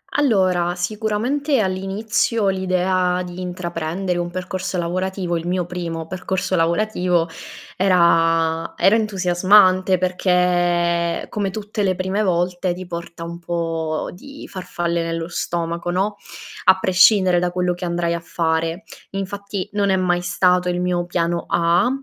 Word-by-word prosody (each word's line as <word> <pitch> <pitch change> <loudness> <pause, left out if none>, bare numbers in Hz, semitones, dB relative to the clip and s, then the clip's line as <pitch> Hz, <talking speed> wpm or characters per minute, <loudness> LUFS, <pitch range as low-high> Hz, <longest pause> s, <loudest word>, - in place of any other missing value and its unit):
Allora, 185 -10 +2
sicuramente 220 - -1
all'inizio, 200 +2 0
l'idea 185 -1 +1
di 180 +1 -7
intraprendere 175 0 -3
un 175 0 -2
percorso 185 +1 -4
lavorativo 180 +1 -2
il 165 +1 -5
mio 180 -1 0
primo 170 -2 -5
percorso 185 +1 -2
lavorativo, 175 0 +1 0.5
era 165 -3 +2
era 200 +3 +5
entusiasmante, 185 -2 +4
perché 175 -2 +1
come 205 -2 -2
tutte 210 +1 -5
le 190 -2 +1
prime 190 +3 -1
volte 180 -1 0
ti 185 +1 -7
porta 170 -1 -7
un 170 0 -7
po' 165 -2 -2
di 280 +10 -11
farfalle 170 -2 -3
nello 165 0 -3
stomaco, 170 0 -3
no, 195 +3 -1 0.5
a 190 0 +6
prescindere 185 -1 +4
da 180 0 0
quello 180 0 0
che 175 +1 -6
andrai 170 0 -1
a 170 - -2
fare. 165 +2 -1 0.3
Infatti 200 0 -4
non 200 -1 +1
è 190 - +3
mai 175 -1 +1
stato 180 0 +2
il 180 0 -1
mio 175 -1 -1
piano 170 -1 -1
A, 175 +5 +3
180 Hz, 135 wpm, -21 LUFS, 170-190 Hz, 0.5 s, a